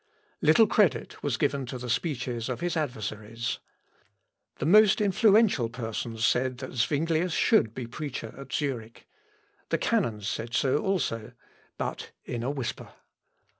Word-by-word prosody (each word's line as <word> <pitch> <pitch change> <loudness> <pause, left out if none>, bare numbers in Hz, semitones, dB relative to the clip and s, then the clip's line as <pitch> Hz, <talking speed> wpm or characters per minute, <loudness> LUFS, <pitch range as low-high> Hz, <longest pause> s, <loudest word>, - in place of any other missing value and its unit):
Little 160 +9 +6
credit 180 - +1
was 140 -5 -1
given 140 -2 0
to 130 - -5
the 125 0 -7
speeches 120 -2 -2
of 125 - -3
his 175 0 -1
adversaries. 115 - -3 1.0
The - - -4
most 210 +4 +6
influential 205 - +4
persons 115 -1 -3
said, 125 0 +1
that 130 0 -7
Zuinglius 160 +7 +1
should 140 - +3
be 125 - -4
preacher 125 -2 -6
at 135 0 -10
Zurich. 120 -6 -3 0.6
The - - +2
canons 115 - 0
said 115 +2 -3
so 135 0 +2
also, 150 - -1 0.4
but - - -4
in 120 - -4
a 125 - -1
whisper. 130 -4 -4
130 Hz, 135 wpm, -28 LUFS, 115-160 Hz, 1.0 s, Little